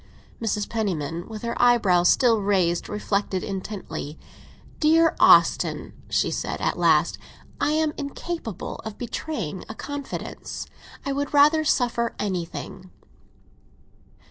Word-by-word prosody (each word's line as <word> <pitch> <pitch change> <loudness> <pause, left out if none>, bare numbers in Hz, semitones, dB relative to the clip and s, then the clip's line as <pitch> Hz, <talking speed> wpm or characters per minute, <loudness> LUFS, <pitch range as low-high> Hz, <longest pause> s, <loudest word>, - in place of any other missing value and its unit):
Mrs. 210 -2 -1
Penniman, 175 -7 -2
with 220 -1 -7
her 235 0 -2
eyebrows 200 -8 +4
still 230 -4 +4
raised, 185 -4 +1
reflected 200 -2 -1
intently. 190 -6 -5 0.6
"Dear 325 +1 +4
Austin," - - +4 0.2
she - - +1
said - - -3
at - - 0
last, - - +3 0.4
"I 300 - +1
am 310 -1 +1
incapable 280 - -5
of 220 -1 -8
betraying 230 - -4
a 220 - -6
confidence. 285 +1 -6 0.4
I 275 - -1
would 285 +1 -2
rather 300 +2 +6
suffer 235 -5 +1
anything." 185 -1 -4
220 Hz, 115 wpm, -24 LUFS, 185-280 Hz, 0.6 s, rather